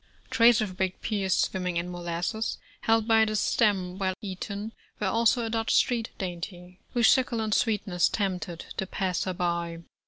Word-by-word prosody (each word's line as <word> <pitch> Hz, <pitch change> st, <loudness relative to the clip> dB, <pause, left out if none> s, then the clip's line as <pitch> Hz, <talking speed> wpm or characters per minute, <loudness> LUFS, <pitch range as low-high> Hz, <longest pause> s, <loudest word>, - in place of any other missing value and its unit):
Trays 230 Hz, -1 st, +6 dB
of 190 Hz, -4 st, -3 dB
baked 190 Hz, -1 st, -2 dB
pears 200 Hz, -4 st, 0 dB
swimming 180 Hz, -2 st, 0 dB
in 175 Hz, +1 st, -2 dB
molasses, 175 Hz, +5 st, -2 dB, 0.2 s
held 225 Hz, -1 st, +2 dB
by 225 Hz, -1 st, +5 dB
the 215 Hz, -1 st, 0 dB
stem 195 Hz, -4 st, +1 dB
while 190 Hz, -1 st, 0 dB
eaten, 205 Hz, +1 st, -5 dB, 0.3 s
were 210 Hz, -, -1 dB
also 230 Hz, +4 st, +2 dB
a -, -, -3 dB
Dutch 225 Hz, 0 st, +1 dB
street 235 Hz, -3 st, +2 dB
dainty, 180 Hz, 0 st, -6 dB, 0.2 s
whose 235 Hz, -2 st, +5 dB
succulent 230 Hz, -5 st, +2 dB
sweetness 205 Hz, -6 st, +2 dB
tempted 180 Hz, -4 st, -3 dB
the 190 Hz, -, -2 dB
passer 185 Hz, -1 st, -1 dB
by. 170 Hz, -1 st, -2 dB
195 Hz, 155 wpm, -27 LUFS, 180-220 Hz, 0.3 s, Trays